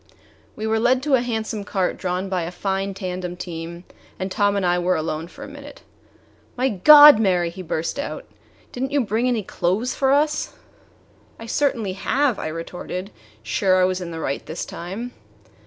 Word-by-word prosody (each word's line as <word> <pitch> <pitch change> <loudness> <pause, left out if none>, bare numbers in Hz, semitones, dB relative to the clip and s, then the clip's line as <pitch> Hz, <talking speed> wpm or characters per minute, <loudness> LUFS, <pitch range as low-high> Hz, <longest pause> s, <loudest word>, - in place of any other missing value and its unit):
We 215 - -5
were 220 0 +1
led 255 +3 +2
to 295 -1 0
a 255 - +5
handsome 220 -3 -3
cart 190 -2 -1
drawn 180 +1 -3
by 185 -2 -1
a 165 - -3
fine 195 +2 -3
tandem 180 -2 -5
team, 170 0 -7 0.3
and 185 0 -4
Tom 205 +1 +2
and 200 -2 0
I 175 0 +2
were 180 +1 +1
alone 160 +1 -3
for - - -12
a - - -7
minute. 285 0 -12 0.7
"My 260 +2 +2
God, 290 +6 +9
Mary!" 180 -5 +2
he 185 - -8
burst 165 - -3
out, 285 - -5 0.5
"didn't 265 +2 -3
you 285 -1 +2
bring 230 +2 0
any 235 -4 0
clothes 190 +7 -1
for 270 -2 +1
us?" 300 +2 +1 0.8
"I 225 - -9
certainly 230 -5 0
have," 255 +5 0
I - - -3
retorted, 175 +4 -6 0.3
sure 185 - +2
I 185 - +5
was 185 0 -1
in 175 - -5
the 165 -1 -6
right 140 -3 -3
this 160 - -5
time. 195 +9 -6
195 Hz, 185 wpm, -22 LUFS, 180-245 Hz, 0.8 s, God